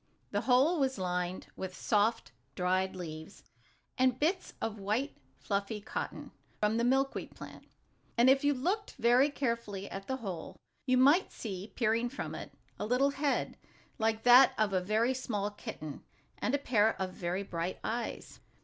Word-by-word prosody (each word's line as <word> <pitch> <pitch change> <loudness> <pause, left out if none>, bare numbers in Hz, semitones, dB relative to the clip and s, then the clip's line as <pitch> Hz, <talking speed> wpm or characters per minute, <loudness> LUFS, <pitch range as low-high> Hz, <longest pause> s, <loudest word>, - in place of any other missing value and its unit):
The - - 0
hole 275 +7 +4
was 265 -3 +1
lined 180 -1 -2
with 185 -1 -6
soft, 220 +2 +1 0.2
dried 185 +1 0
leaves, 160 0 -8 0.6
and 255 -1 +3
bits 360 +5 0
of 220 -1 -3
white, 220 +9 -1 0.2
fluffy 200 +1 -2
cotton, 205 - -5 0.3
from 210 +1 +2
the 235 - +1
milkweed 270 +2 0
plant. - - -11 0.5
And, 240 +2 +6
if 270 +1 +5
you 290 - +4
looked 380 - -1
very 245 +5 +4
carefully 230 -8 -3
at 195 0 -6
the 260 - -1
hole, 190 -9 -6 0.3
you 255 0 +4
might 285 +9 +5
see, 200 -2 -6
peering 230 0 +1
from 270 - -5
it, - - -7 0.3
a - - -2
little 260 +4 +3
head, 285 0 -1 0.4
like 220 0 +1
that 250 +2 +8
of 215 -2 +1
a 185 - +2
very 220 +7 +1
small 210 -5 -2
kitten, 155 -7 -8 0.4
and 260 - +1
a - - +2
pair 225 -6 +2
of 190 -1 -2
very 180 +2 -2
bright 170 -1 -3
eyes. 235 +1 -4
225 Hz, 160 wpm, -32 LUFS, 195-260 Hz, 0.6 s, that